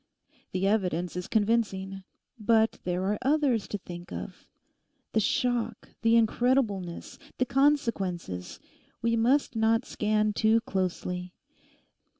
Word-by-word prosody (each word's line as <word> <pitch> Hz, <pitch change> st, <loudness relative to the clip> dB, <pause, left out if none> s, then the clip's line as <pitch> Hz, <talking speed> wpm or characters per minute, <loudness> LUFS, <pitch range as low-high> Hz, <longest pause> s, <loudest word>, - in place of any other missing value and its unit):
The 185 Hz, +1 st, -1 dB
evidence 180 Hz, -4 st, 0 dB
is 180 Hz, 0 st, -4 dB
convincing. 200 Hz, -3 st, 0 dB, 0.4 s
But 220 Hz, +1 st, +3 dB
there 180 Hz, +1 st, -1 dB
are 205 Hz, +2 st, 0 dB
others 270 Hz, -5 st, +2 dB
to 205 Hz, -, -3 dB
think 175 Hz, -2 st, -10 dB
of. -, -, -7 dB, 0.6 s
The 220 Hz, -, +2 dB
shock, 235 Hz, 0 st, 0 dB
the 230 Hz, 0 st, +4 dB
incredibleness, 225 Hz, -6 st, +1 dB, 0.2 s
the 255 Hz, -, +2 dB
consequences; 230 Hz, -, 0 dB, 0.4 s
we 230 Hz, 0 st, +2 dB
must 250 Hz, +3 st, +2 dB
not 225 Hz, +2 st, +2 dB
scan 215 Hz, 0 st, 0 dB
too 220 Hz, +2 st, +3 dB
closely. 180 Hz, -3 st, -3 dB
220 Hz, 115 wpm, -28 LUFS, 190-235 Hz, 0.6 s, the